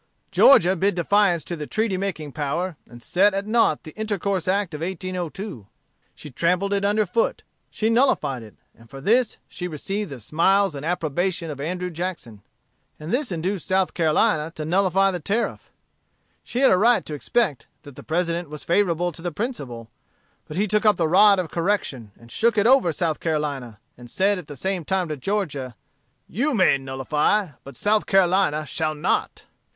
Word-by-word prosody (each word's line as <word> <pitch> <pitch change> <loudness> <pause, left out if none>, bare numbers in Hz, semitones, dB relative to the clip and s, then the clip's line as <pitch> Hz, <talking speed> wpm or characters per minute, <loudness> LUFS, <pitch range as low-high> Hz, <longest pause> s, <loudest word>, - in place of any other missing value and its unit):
Georgia 190 -9 +6
bid 195 +2 +1
defiance 180 -1 +2
to 175 - -5
the 150 -2 -6
treaty 220 -3 -1
making 185 -6 -4
power, 160 +5 -2
and 120 0 -12
set 195 +2 +3
at 195 0 -2
nought 220 -8 +2
the 155 - -10
Intercourse 200 -4 -2
Act 190 -2 0
of 150 - -6
1802; 180 - -5 0.5
she 150 - -11
trampled 180 +8 0
it 200 0 0
under 210 +1 +2
foot; 215 +5 -1 0.3
she 220 - -2
nullified 230 - +2
it: 110 -2 -13 0.2
and 115 0 -19
for 135 - -9
this, 230 - +2
she 180 - -6
received 195 +5 -4
the 135 -3 -8
smiles 190 - +2
and 140 -1 -7
approbation 170 +1 -1
of 140 -2 -7
Andrew 180 +4 -3
Jackson. 160 - -5 0.6
And 155 +3 -5
this 255 -3 0
induced 180 +2 -3
South 190 0 +1
Carolina 155 -1 +1
to 155 - -5
nullify 195 +3 +2
the 180 - -4
Tariff. 205 +9 -2 0.7
She 245 - -3
had 270 - +6
a 185 - +5
right 235 +3 +3
to 155 - -6
expect 150 - -1 0.2
that 145 -3 -12
the - - -10
President 170 0 -2
was 150 0 -7
favorable 175 -1 +1
to 165 - -11
the 175 0 -3
principle: 140 - -5 0.6
but 155 - -7
he 205 +2 +1
took 210 +1 +1
up 210 -1 +5
the 165 - +1
rod 200 +4 +6
of 180 -4 -3
correction, 165 - -1
and 115 0 -16
shook 230 - +1
it 205 - +3
over 245 -8 +5
South 160 -1 -1
Carolina, 145 -8 -3 0.2
and 120 0 -13
said 195 - +1
at 165 - -11
the 145 - -8
same 190 +4 -2
time 185 +1 -1
to 155 - -2
Georgia, 145 - -3 0.5
'You 275 - -1
may 185 -9 +4
nullify, 150 +9 0
but 140 - -11
South 210 +1 +1
Carolina 185 -5 +2
shall 155 +2 -2
not.' 150 - -1
180 Hz, 180 wpm, -23 LUFS, 150-200 Hz, 0.7 s, Georgia